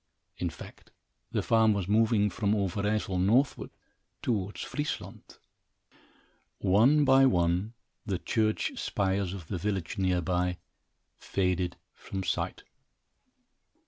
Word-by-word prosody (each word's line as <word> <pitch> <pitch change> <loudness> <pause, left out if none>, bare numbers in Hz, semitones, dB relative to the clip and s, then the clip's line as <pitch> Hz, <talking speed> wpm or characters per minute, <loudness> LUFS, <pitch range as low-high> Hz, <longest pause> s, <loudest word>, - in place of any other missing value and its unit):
In 90 - -1
fact, 80 - -12 0.4
the - - -1
farm 110 -1 +4
was 100 -3 -2
moving 105 0 +3
from 105 -1 0
Overijssel 100 0 -1
northward, 115 +9 +2 0.5
towards 105 -4 -2
Friesland. 150 0 -5 1.2
One 125 +11 +4
by 135 0 +6
one, 90 +1 +1 0.3
the 100 -4 -2
church 110 +3 -1
spires 95 -1 0
of 95 -4 -7
the 90 - -3
village 100 0 -3
near 90 -2 +1
by 90 0 0 0.6
faded 90 -2 -1 0.2
from 95 -1 -6
sight. 85 - -2
100 Hz, 110 wpm, -29 LUFS, 90-110 Hz, 1.2 s, by